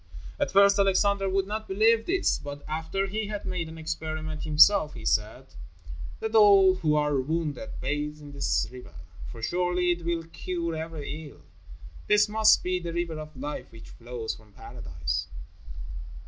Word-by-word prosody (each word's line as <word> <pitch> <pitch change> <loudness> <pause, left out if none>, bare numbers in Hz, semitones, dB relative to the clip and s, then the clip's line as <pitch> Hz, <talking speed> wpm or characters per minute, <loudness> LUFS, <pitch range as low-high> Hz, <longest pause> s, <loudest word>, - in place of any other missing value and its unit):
At - - +1
first 200 +1 +5
Alexander 195 0 +2
would 190 0 +1
not 215 +2 -4
believe 225 +3 +3
this, 375 +1 +1
but 145 0 -8
after 160 +5 -2
he 210 +2 -3
had 210 -1 -5
made 170 -3 -3
an 160 - -10
experiment 155 0 -4
himself, 155 +1 +5
he 115 -2 -9
said: 110 +5 -1 0.7
"Let 220 0 -4
all 200 -3 +7
who 160 -5 0
are 150 -2 +2
wounded 160 - -3
bathe 150 +1 -3
in 145 -1 -11
this 140 0 0
river, 125 -10 -12 0.4
for 115 - -10
surely 180 +2 +1
it 175 0 -3
will 170 0 -1
cure 170 0 -4
every 160 -1 -6
ill. - - -18 0.6
This 210 0 +5
must 215 +1 +4
be 180 0 0
the 170 -1 -5
River 170 -2 -2
of 155 -2 -9
Life 145 +3 -6
which 115 -1 -13
flows 120 -1 -5
from 105 -2 -17
Paradise." 75 -8 -5
165 Hz, 160 wpm, -27 LUFS, 150-195 Hz, 0.7 s, all